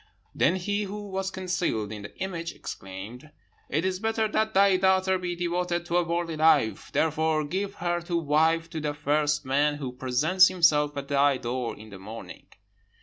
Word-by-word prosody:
"Then 175 Hz, -, +2 dB
he 205 Hz, +3 st, -1 dB
who 205 Hz, +1 st, -7 dB
was 190 Hz, 0 st, -2 dB
concealed 180 Hz, -, -2 dB
in 105 Hz, -1 st, -6 dB
the 100 Hz, -, -11 dB
image 170 Hz, -3 st, -4 dB
exclaimed, 100 Hz, +9 st, -8 dB, 0.4 s
'It 155 Hz, +6 st, 0 dB
is 185 Hz, -1 st, -1 dB
better 220 Hz, +1 st, 0 dB
that 220 Hz, 0 st, 0 dB
thy 195 Hz, 0 st, +5 dB
daughter 190 Hz, 0 st, +2 dB
be 175 Hz, -1 st, -3 dB
devoted 175 Hz, 0 st, -1 dB
to 175 Hz, 0 st, 0 dB
a 175 Hz, -, +3 dB
worldly 170 Hz, -1 st, -2 dB
life. 130 Hz, -10 st, +3 dB
Therefore, 160 Hz, 0 st, +1 dB
give 195 Hz, +6 st, -3 dB
her 175 Hz, 0 st, -1 dB
to 170 Hz, 0 st, -2 dB
wife 160 Hz, +1 st, +2 dB
to 160 Hz, -, -4 dB
the 150 Hz, -1 st, -3 dB
first 150 Hz, +1 st, 0 dB
man 145 Hz, +3 st, +2 dB
who 135 Hz, -4 st, -5 dB
presents 130 Hz, +9 st, +3 dB
himself 150 Hz, -5 st, +3 dB
at 140 Hz, 0 st, -4 dB
thy 140 Hz, -1 st, +3 dB
door 120 Hz, 0 st, -3 dB
in 110 Hz, 0 st, -13 dB
the 95 Hz, -, -10 dB
morning.' 110 Hz, +4 st, -10 dB
165 Hz, 180 wpm, -27 LUFS, 145-185 Hz, 0.4 s, thy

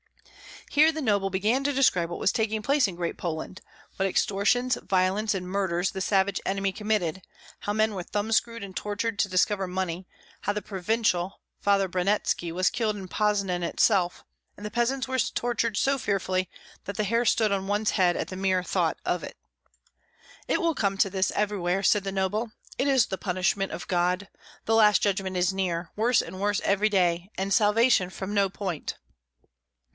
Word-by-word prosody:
Here 310 Hz, +2 st, +5 dB
the 315 Hz, 0 st, -5 dB
noble 200 Hz, -6 st, +1 dB
began 215 Hz, +8 st, 0 dB
to 285 Hz, -, +1 dB
describe 185 Hz, -11 st, +2 dB
what 175 Hz, -, -5 dB
was -, -, +2 dB
taking 220 Hz, -1 st, -1 dB
place 280 Hz, -1 st, +3 dB
in 185 Hz, -, -6 dB
Great 170 Hz, -1 st, -3 dB
Poland, 170 Hz, +2 st, -5 dB, 0.4 s
what 195 Hz, -, +1 dB
extortions, 215 Hz, +7 st, +1 dB
violence, 195 Hz, +3 st, +1 dB
and 180 Hz, -1 st, -4 dB
murders 185 Hz, -1 st, 0 dB
the 190 Hz, -, -5 dB
savage 195 Hz, 0 st, +1 dB
enemy 195 Hz, 0 st, 0 dB
committed; 200 Hz, -4 st, -1 dB, 0.4 s
how 205 Hz, -, -3 dB
men 215 Hz, 0 st, +1 dB
were 190 Hz, -, -4 dB
thumbscrewed 220 Hz, +4 st, -1 dB
and 190 Hz, -2 st, -9 dB
tortured 210 Hz, +1 st, -3 dB
to 195 Hz, -, +2 dB
discover 190 Hz, +1 st, +1 dB
money; 180 Hz, 0 st, -3 dB, 0.4 s
how 205 Hz, -, 0 dB
the 210 Hz, -, -3 dB
Provincial, 195 Hz, -1 st, -1 dB, 0.2 s
Father 200 Hz, -1 st, +2 dB
Branetski, 180 Hz, -2 st, 0 dB
was 185 Hz, +1 st, +2 dB
killed 220 Hz, -3 st, -1 dB
in 190 Hz, -3 st, -8 dB
Poznan 200 Hz, -4 st, 0 dB
itself; 180 Hz, 0 st, +1 dB, 0.3 s
and 210 Hz, 0 st, -7 dB
peasants 255 Hz, +3 st, 0 dB
were 260 Hz, 0 st, 0 dB
tortured 235 Hz, -3 st, -1 dB
so 275 Hz, +4 st, +2 dB
fearfully 185 Hz, -4 st, -1 dB, 0.4 s
that 200 Hz, -, -5 dB
the 215 Hz, -, +1 dB
hair 230 Hz, +4 st, +1 dB
stood 220 Hz, -3 st, +3 dB
on 195 Hz, -1 st, -1 dB
one's 205 Hz, +1 st, +1 dB
head 180 Hz, -3 st, +2 dB
at -, -, -3 dB
the 185 Hz, -, -6 dB
mere 185 Hz, -1 st, +1 dB
thought -, -, 0 dB
of -, -, -1 dB
it. -, -, -10 dB, 1.1 s
"It -, -, +1 dB
will 335 Hz, -1 st, +2 dB
come 200 Hz, -7 st, 0 dB
to 195 Hz, -, +4 dB
this 190 Hz, -1 st, 0 dB
everywhere," 195 Hz, -2 st, -1 dB
said 205 Hz, 0 st, +3 dB
the 195 Hz, -, -2 dB
noble; 210 Hz, +4 st, -1 dB, 0.3 s
"it 270 Hz, -, +2 dB
is 265 Hz, -4 st, +4 dB
the 190 Hz, -, -4 dB
punishment 190 Hz, +1 st, -1 dB
of 170 Hz, -, -7 dB
God. 180 Hz, +2 st, 0 dB, 0.4 s
The 225 Hz, -, +1 dB
last 210 Hz, -2 st, +5 dB
judgment 190 Hz, -2 st, 0 dB
is 180 Hz, +1 st, +2 dB
near. 175 Hz, -3 st, -2 dB
Worse 235 Hz, +3 st, +3 dB
and 185 Hz, -, -9 dB
worse 205 Hz, +1 st, 0 dB
every 200 Hz, +2 st, +2 dB
day, 180 Hz, -2 st, +1 dB
and 195 Hz, +1 st, -1 dB
salvation 215 Hz, -2 st, +4 dB
from 190 Hz, +2 st, -6 dB
no 200 Hz, -1 st, +2 dB
point." 185 Hz, -5 st, -4 dB
200 Hz, 180 wpm, -26 LUFS, 185-215 Hz, 1.1 s, Here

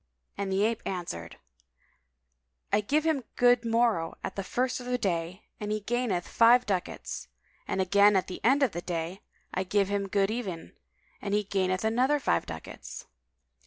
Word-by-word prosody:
and 200 Hz, -1 st, -3 dB
the 195 Hz, +2 st, +2 dB
ape 225 Hz, +1 st, +1 dB
answered, 170 Hz, -, -5 dB, 1.4 s
"I 205 Hz, -, +4 dB
give 295 Hz, +9 st, +1 dB
him 315 Hz, -5 st, +1 dB
good 245 Hz, -1 st, +4 dB
morrow 230 Hz, -7 st, +1 dB
at -, -, -4 dB
the 195 Hz, -, -3 dB
first 250 Hz, +7 st, -1 dB
of 245 Hz, -, -8 dB
the 250 Hz, 0 st, +1 dB
day, 180 Hz, -2 st, -2 dB, 0.2 s
and 210 Hz, 0 st, -3 dB
he 215 Hz, 0 st, -1 dB
gaineth 225 Hz, -5 st, -1 dB
five 240 Hz, +2 st, +5 dB
ducats; 185 Hz, -, -3 dB, 0.4 s
and -, -, -1 dB
again 200 Hz, +2 st, +5 dB
at 190 Hz, -, +2 dB
the 185 Hz, -, -8 dB
end 270 Hz, +5 st, +4 dB
of 255 Hz, -, +3 dB
the 175 Hz, -, -4 dB
day, 175 Hz, +1 st, -4 dB, 0.3 s
I 185 Hz, -, 0 dB
give 195 Hz, +1 st, +1 dB
him 200 Hz, -1 st, -1 dB
good 195 Hz, +1 st, +1 dB
even 195 Hz, -8 st, -5 dB, 0.5 s
and 200 Hz, 0 st, -1 dB
he 210 Hz, -, +2 dB
gaineth 190 Hz, 0 st, 0 dB
other 255 Hz, +6 st, +3 dB
five 85 Hz, -, +1 dB
ducats." -, -, -8 dB
200 Hz, 170 wpm, -29 LUFS, 185-240 Hz, 1.4 s, five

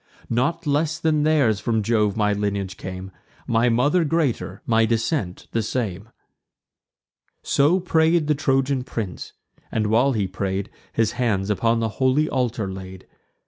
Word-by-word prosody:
Not 155 Hz, +9 st, 0 dB
less 150 Hz, +2 st, +1 dB
than 155 Hz, -2 st, +1 dB
theirs 145 Hz, -9 st, +3 dB
from 110 Hz, -1 st, 0 dB
Jove 105 Hz, -2 st, +1 dB
my 105 Hz, -1 st, +2 dB
lineage 100 Hz, -2 st, -2 dB
came; 95 Hz, 0 st, -7 dB, 0.3 s
My 115 Hz, +1 st, +2 dB
mother 145 Hz, +9 st, +3 dB
greater, 145 Hz, -, -1 dB
my 115 Hz, -1 st, +3 dB
descent 115 Hz, -, -1 dB
the 115 Hz, -, 0 dB
same." 105 Hz, -3 st, -3 dB, 1.3 s
So 150 Hz, +7 st, +3 dB
pray'd 165 Hz, -2 st, +2 dB
the 150 Hz, -, +2 dB
Trojan 135 Hz, -2 st, +1 dB
prince, 105 Hz, -8 st, -5 dB, 0.4 s
and, 110 Hz, -1 st, 0 dB
while 120 Hz, +6 st, +3 dB
he 105 Hz, -4 st, 0 dB
pray'd, 95 Hz, +1 st, -3 dB, 0.2 s
His 115 Hz, -2 st, +1 dB
hand 105 Hz, -5 st, 0 dB
upon 115 Hz, +3 st, +1 dB
the 115 Hz, -, 0 dB
holy 130 Hz, +4 st, +3 dB
altar 120 Hz, -7 st, -1 dB
laid. 95 Hz, 0 st, -8 dB
115 Hz, 145 wpm, -23 LUFS, 100-140 Hz, 1.3 s, theirs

